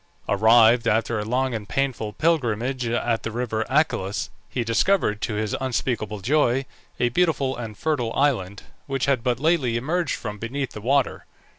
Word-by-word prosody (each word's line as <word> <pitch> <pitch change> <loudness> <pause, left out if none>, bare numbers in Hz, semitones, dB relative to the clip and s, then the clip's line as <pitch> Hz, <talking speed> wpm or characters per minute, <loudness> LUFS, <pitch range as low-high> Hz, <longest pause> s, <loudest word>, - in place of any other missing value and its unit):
Arrived 115 +3 +5
after 110 +1 +1
a - - -2
long 125 +3 0
and 105 -3 -5
painful 130 -6 -1
pilgrimage 125 -3 0
at 115 0 0
the - - -4
river 110 -1 -2
Achelous, 130 -9 0 0.2
he 125 - -2
discovered, 115 - +1
to 105 - -2
his 105 -1 -1
unspeakable 115 -5 -2
joy, 135 +2 +2 0.3
a 120 - +2
beautiful 140 -2 +1
and 110 -4 -7
fertile 140 -8 -1
island, 100 -9 0 0.2
which 135 -2 -1
had 135 -4 +1
but 120 -2 0
lately 145 -7 +2
emerged 160 +6 -1
from 105 0 -6
beneath 130 +3 -3
the 105 - -8
water. 135 +3 0
120 Hz, 160 wpm, -24 LUFS, 110-135 Hz, 0.3 s, Arrived